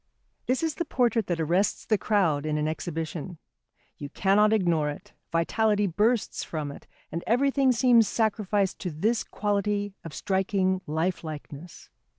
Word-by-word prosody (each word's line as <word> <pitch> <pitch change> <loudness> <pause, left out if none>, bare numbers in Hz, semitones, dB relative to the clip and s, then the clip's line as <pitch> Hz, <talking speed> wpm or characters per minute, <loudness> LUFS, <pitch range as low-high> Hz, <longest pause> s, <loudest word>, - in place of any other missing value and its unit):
This 255 +5 0
is 320 -2 0
the 340 - -2
portrait 235 -7 +1
that 175 -2 -1
arrests 175 +6 +1
the 215 - +2
crowd 185 -9 +1
in 155 0 -1
an 150 0 0
exhibition. 160 +1 -4 0.6
You 145 - -6
cannot 200 +6 +3
ignore 170 -8 +2
it, 195 +7 -9 0.2
vitality 210 +5 +2
bursts 210 +6 0
from 150 -3 -4
it, - - -12 0.2
and 170 - -4
everything 270 +3 +3
seems 240 -2 +4
sacrificed 205 -3 0
to 180 - -3
this 215 +9 0
quality 205 -1 -1
of 165 - -8
striking 190 -1 0
lifelikeness. 160 -1 -4
195 Hz, 145 wpm, -27 LUFS, 165-220 Hz, 0.6 s, seems